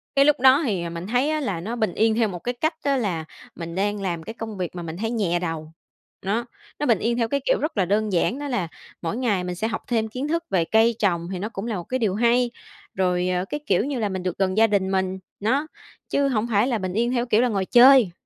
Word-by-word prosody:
Cái 275 0 +5
lúc 295 -1 +4
đó 265 +4 +6
hì 190 - -1
mình 170 +2 -6
thấy 250 +6 +1
á 310 0 0
là 195 - -2
nó 225 +6 -4
bình 220 -6 -1
yên 220 0 +2
theo 225 -1 +2
một 180 -4 -6
cái 245 +8 -3
cách 315 +7 -1
á 280 -1 +2
là 180 -9 -2 0.3
mình 165 -1 -6
đang 205 +1 -1
làm 170 -4 -3
cái 225 - -7
công 220 -3 -7
việc 180 -1 -4
mà 175 - -5
mình 165 +1 -6
thấy 225 +3 -2
nhẹ 185 -7 0
đầu. 160 -2 -4 0.5
Đó, 220 +5 -1 0.3
nó 295 - 0
bình 230 -7 +3
yên 235 +1 0
theo 230 -2 +1
cái 280 +5 0
kiểu - - +2
rất 300 -5 -3
là 190 - +3
đơn 210 +2 0
giản, 230 +9 +1
đó 290 - -4
là 235 -10 -1 0.3
mỗi 170 +6 -3
ngày 215 -8 0
mình 180 0 -4
sẽ 220 +5 -1
học 225 0 -3
thêm 225 -2 0
kiến 255 +6 -4
thức 335 +2 -1
về 175 -4 +2
cây 225 +4 +3
trồng 170 -4 0
hì 185 -1 -4
nó 210 +4 -3
cũng 200 -1 -6
là 225 - -2
một 175 - -4
cái 255 +6 -3
điều 205 -5 +1
hay. 240 +2 +2 0.4
Rồi, 180 -1 +1
ờ, 180 +1 0
cái, 295 - -4
kiểu 200 +5 +2
như 275 -4 -2
là, 210 -2 0
mình 190 -1 -4
được 180 -2 -3
gần 190 +1 0
gia 225 - +6
đình 195 -3 0
mình, 190 0 -1 0.2
nó, 260 +9 +1 0.4
chứ 280 0 +2
hổng 235 -3 0
phải 220 +1 +2
là 245 -4 0
bình 185 -3 -4
yên 235 +4 +1
theo, 245 -1 0
kiểu 230 -2 +3
là, 250 - +3
ngồi 195 -4 -1
chơi. 245 -3 +7
215 Hz, 275 wpm, -24 LUFS, 185-245 Hz, 0.5 s, chơi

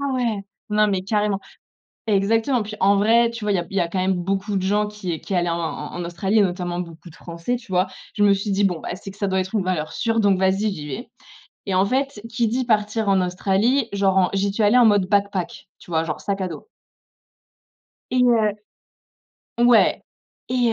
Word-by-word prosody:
ah 280 -1 -1
ouais, 230 -5 -1 0.2
non 210 0 +3
mais 195 -3 0
carrément! 205 0 0 0.7
Exactement, 220 +4 +2
puis 215 +1 -7
en 200 +1 +4
vrai, 230 +3 +4
tu 230 -2 -7
vois? 205 - +1
Il - - +2
y 180 - +1
a - - -2
b - - -17
il 195 - -4
y - - +4
a 170 - +1
quand 185 +2 -3
même 190 +1 +1
beaucoup 195 +3 -2
de - - -1
gens 210 +2 +1
qui 190 -6 -5
qui - - -6
allaient 175 0 +1
en 170 - -1
en 160 -3 -4
en 175 - -4
Australie 190 +5 0
et - - +6
notamment 180 -2 -1
beaucoup 170 0 -11
de 165 - -16
Français, 170 +9 -4
tu 235 -5 -10
vois? 185 +1 +2 0.3
Je 205 - +3
me 200 - +6
suis 200 +1 -2
dit: 195 +1 +1
«Bon, 180 -4 0
bah, - - -5
c'est 195 +1 -9
que 200 - -17
ça 200 - -1
doit 190 0 +1
être 185 +3 -3
une 200 - +1
valeur 160 -4 -2
sûre, 230 -1 0
donc 200 -3 +3
vas-y, 195 +2 +1
j'y 150 -3 -7
vais!». 220 - -6 0.6
Et 190 - 0
en 190 +2 +4
fait, 265 -1 -1
qui 230 +1 +1
dit 250 +3 -1
partir 215 -1 0
en 195 -1 +3
Australie, 195 +8 +1
genre 195 -1 +2
en 180 -2 +4
j'y 195 +1 0
suis 210 +2 -1
allée 215 +5 +5
en 240 - +6
mode 205 -3 +4
backpack, 200 -2 -1
tu 175 - -14
vois? 160 0 +1
Genre, 155 -2 -4
sac 200 -1 -2
à 185 - -1
dos. 170 - -9 1.4
Et 250 0 +3
heu 225 -4 +3 1.1
ouais. 240 -2 +4 0.5
Et, 245 -2 +2
200 Hz, 235 wpm, -22 LUFS, 185-220 Hz, 1.4 s, et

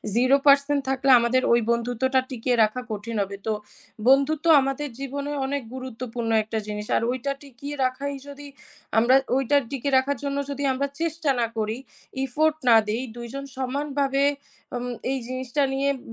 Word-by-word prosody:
0% 280 +3 +4
থাকলে 270 0 0
আমাদের 235 +2 +2
ওই 235 - +4
বন্ধুত্বটা 245 +3 +1
টিকিয়ে 250 0 0
রাখা 215 +4 0
কঠিন 215 +2 -5
হবে। 200 0 -4
তো 220 - +2 0.5
বন্ধুত্ব 280 +4 +4 0.2
আমাদের 275 +2 -2
জীবনে 280 +1 -4
অনেক 280 0 -2
গুরুত্বপূর্ণ 245 -2 -5
একটা 220 +1 -3
জিনিস। 210 0 -5
আর - - 0
ওইটা 260 +2 -2
টিকিয়ে 280 +2 -8
রাখাই 275 +2 -2
যদি 285 0 -9 0.5
আমরা 235 +4 +5 0.2
ওইটার 275 +2 +2
টিকে 275 0 -2
রাখার 270 +1 +1
জন্য 280 0 -2
যদি 280 0 -4
আমরা 280 +2 -1
চেষ্টা 330 -2 -1
না 235 - +2
করি, 220 +1 -1 0.5
effort 300 +4 +1
না 230 - +8
দেই, 225 +3 -1 0.2
২ 235 0 -6
জন 275 0 -5
সমানভাবে 275 +1 -1 0.5
আম 245 0 -3 0.3
এই 270 - -1
জিনিসটা 255 +2 -1
নিয়ে 275 +1 +1
ব - - -14
265 Hz, 160 wpm, -24 LUFS, 240-280 Hz, 0.5 s, না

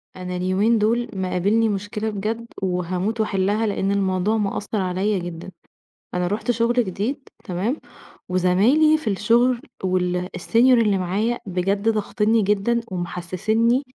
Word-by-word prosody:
أنا 180 0 -5
اليومين 190 +6 +2
دُول 230 +3 +1
مقابلني 195 +4 +1
مشكلة 205 +2 -3
بجد 220 +3 -3
وهاموت 185 +4 -1
وأحلّها، 205 +1 0
لإن 200 -1 0
الموضوع 195 +1 +1
مأثر 205 0 -2
عليَّ 190 +2 0
جدًا، 175 +1 -7 0.6
أنا 180 0 0
رُحت 210 +5 -2
شغل 235 0 +1
جديد 225 +9 -4 0.2
تمام، 200 - -2 0.5
وزمايلي 205 - +4
في 235 -8 -2
الشغل 235 +5 +2 0.2
وال 180 -1 0
الsenior 180 - -5
اللي 230 -5 +5
معايا 205 +6 -1
بجد 195 +3 0
ضاغِطْنَنِي 220 +1 +1
جدًا، 210 +4 +1
ومحسّسني 185 +7 0
205 Hz, 125 wpm, -22 LUFS, 185-225 Hz, 0.6 s, اللي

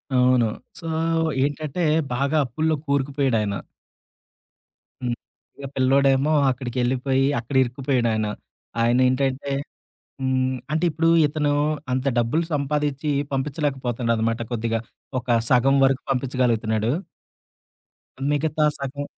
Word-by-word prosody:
అవును. 125 -1 +4 0.3
సో, 165 - -11 0.6
ఏంటంటే 145 +4 -2 0.3
బాగా 140 +5 +1
అప్పు‌‌ల్లో 155 +6 0
కోరుకుపోయాడాయన. 135 -7 0 1.5
హ్మ్. 120 -1 -1 0.4
ఇక 140 - -8
పిల్లోడేమో 135 +2 +3 0.2
అక్కడికెళ్ళిపోయి 130 +1 0
అక్కడ 120 +4 -7
ఇరుక్కుపోయడాయన. 120 -4 0 0.5
ఆయన 120 +2 +3
ఏంటంటే 135 +1 0 0.7
హ్మ్. 130 0 +1 0.2
అంటే 160 +3 +1
ఇప్పుడు 165 +1 +1 0.2
ఇతను 150 0 0 0.4
అంత 130 +2 -1
డబ్బులు 120 +9 +1
సంపాదించి 145 0 -1 0.2
పంపించలేకపోతున్నాడనమాట 125 -5 -1
కొద్దిగా. 115 -1 -1 0.4
ఒక 125 - -23 0.2
సగం 130 +2 +4
వరకు 135 0 +2
పంపించగలుగుతున్నాడు 120 -4 0 1.4
మిగతా 150 +1 +1
సగం 140 +1 -4
130 Hz, 90 wpm, -23 LUFS, 120-140 Hz, 1.5 s, అవును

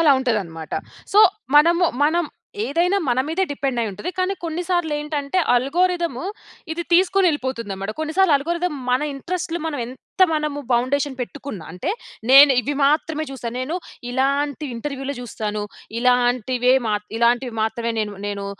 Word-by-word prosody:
అలా 320 -3 +5
ఉంటదన్నమాట. 190 - -2 0.4
సో, 415 - +8 0.4
మనము, 340 +4 +5 0.2
మనం 340 +3 +2 0.4
ఏదైనా 355 +5 +1
మన 245 0 +2
మీదే 325 +5 0
డిపెండ్ 275 -3 -2
అయ్యి 225 -2 -1
ఉంటది. 210 - -5
కానీ 370 +1 0
కొన్నిసార్లు 345 0 -1
ఏంటంటే 295 +2 -2 0.2
అల్గోరిథము 335 +2 +1 0.5
ఇది 340 +1 -3
తీసుకొని 375 +2 +4
ఎళ్ళిపోతుందనమాట. 230 -9 -3
కొన్ని 315 0 -2
సార్లు 380 -4 +5
ఆల్గోరిథం 340 +4 -2 0.2
మన 250 +3 +2
ఇంట్రెస్టులు 340 +4 -3
మనం 305 -3 -3
ఎంత 260 +9 -3
మనము 300 -2 -1
బౌండేషన్ 265 +3 +1
పెట్టుకున్న 260 -4 -6
అంటే 180 - -3 0.4
నేను 275 +2 +10
ఇవి 285 +3 -3
మాత్రమే 305 +2 +2
చూస్తా. 255 -3 -5
నేను 260 +6 -3 0.4
ఇలాంటి 280 +3 0
ఇంటర్వ్యూ‌లే 275 +3 -4
చూస్తాను. 215 -3 -4 0.4
ఇలాంటివే 250 0 +2
మా 215 - +1 0.2
ఇలాంటివి 240 +1 +2
మాత్రమే 230 +1 -1
నేను, 210 -1 -3
నేను 200 -1 -4
280 Hz, 140 wpm, -22 LUFS, 245-330 Hz, 0.5 s, నేను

